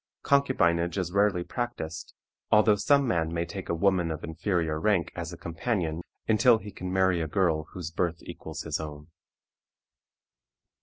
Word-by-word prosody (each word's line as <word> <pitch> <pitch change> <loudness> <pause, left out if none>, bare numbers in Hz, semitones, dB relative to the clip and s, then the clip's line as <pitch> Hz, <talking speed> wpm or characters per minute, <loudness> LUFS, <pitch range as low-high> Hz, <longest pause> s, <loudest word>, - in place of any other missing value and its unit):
Concubinage 85 -12 +2
is 90 -2 -1
rarely 100 -2 +2
practiced, 90 -9 -5 0.3
although 105 0 +6
some 140 +6 +3
man 80 -7 0
may 85 0 -1
take 95 +3 -7
a 85 - +1
woman 90 -1 +2
of 80 -2 -4
inferior 80 -1 -1
rank 100 -1 +1
as 85 0 -5
a 85 - -8
companion 85 -1 -2 0.3
until 115 +2 +5
he 105 -1 -9
can 90 -1 -6
marry 95 -2 +2
a 80 - -2
girl 80 -2 +1
whose 85 -3 -5
birth 85 0 -1
equals 80 +1 -7
his 80 -2 -2
own. 75 0 -8
85 Hz, 155 wpm, -28 LUFS, 80-100 Hz, 0.3 s, although